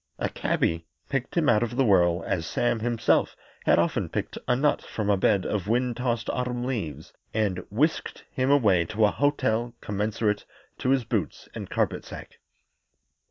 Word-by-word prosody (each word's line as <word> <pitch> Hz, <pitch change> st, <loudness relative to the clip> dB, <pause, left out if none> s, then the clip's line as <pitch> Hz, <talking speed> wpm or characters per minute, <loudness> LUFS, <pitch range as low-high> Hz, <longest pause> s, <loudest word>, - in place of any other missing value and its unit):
A -, -, -1 dB
cabby 80 Hz, 0 st, -1 dB, 0.2 s
picked 135 Hz, +3 st, -2 dB
him 160 Hz, -3 st, +3 dB
out 105 Hz, -2 st, +4 dB
of 120 Hz, 0 st, -2 dB
the 135 Hz, +1 st, +3 dB
whirl, 90 Hz, -4 st, +4 dB
as 80 Hz, -3 st, -1 dB
Sam 120 Hz, +4 st, 0 dB
himself 115 Hz, 0 st, +1 dB, 0.3 s
had -, -, +6 dB
often -, -, +1 dB
picked -, -, -3 dB
a 125 Hz, -, +3 dB
nut 145 Hz, +4 st, +2 dB
from 105 Hz, -2 st, -2 dB
a -, -, +4 dB
bed 95 Hz, 0 st, +2 dB
of 105 Hz, -3 st, -2 dB
wind 120 Hz, +1 st, +1 dB
tossed 120 Hz, -2 st, -1 dB
autumn 125 Hz, -1 st, -2 dB
leaves, 115 Hz, -, -4 dB, 0.2 s
and 100 Hz, -4 st, 0 dB
whisked 145 Hz, +10 st, 0 dB
him 130 Hz, -2 st, 0 dB
away 105 Hz, -11 st, +4 dB
to 110 Hz, +4 st, +2 dB
a 105 Hz, -, +3 dB
hotel 120 Hz, -5 st, 0 dB
commensurate 105 Hz, +1 st, -1 dB, 0.4 s
to 130 Hz, -, -1 dB
his 135 Hz, -2 st, +3 dB
boots -, -, -3 dB
and -, -, -7 dB
carpet -, -, 0 dB
sack. -, -, -10 dB
115 Hz, 170 wpm, -26 LUFS, 100-125 Hz, 0.4 s, had